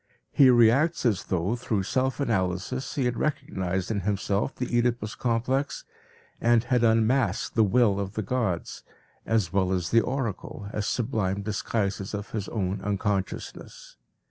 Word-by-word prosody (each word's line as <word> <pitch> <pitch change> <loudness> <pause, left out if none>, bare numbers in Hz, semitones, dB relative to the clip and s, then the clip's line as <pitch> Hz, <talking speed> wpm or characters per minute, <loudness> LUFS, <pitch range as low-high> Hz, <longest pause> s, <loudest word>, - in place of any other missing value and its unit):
He 135 -2 +6
reacts 125 +7 +4
as 105 -7 +1
though 95 +5 0
through 110 -5 -1
self 130 +6 0
analysis 105 +1 -1
he 135 - 0
had 125 -1 -1
recognized 95 -10 -2
in 105 - 0
himself 100 +3 -1
the 125 -1 -3
Oedipus 120 -3 0
complex, 130 +4 -1 0.6
and 120 -1 +4
had 120 0 +1
unmasked 115 -1 +2
the 110 - +4
will 105 -1 +3
of 100 0 -4
the 110 - -2
gods, 100 -5 -2 0.5
as 110 -7 +1
well 95 -1 +2
as 90 -3 -1
the 115 - +5
oracle, 115 -5 -4
as 105 -1 -2
sublime 105 -5 -1
disguises 105 -1 -2
of 105 0 -6
his 105 -3 -4
own 95 -3 -2
unconsciousness. 100 -1 -4
110 Hz, 145 wpm, -26 LUFS, 100-120 Hz, 0.6 s, He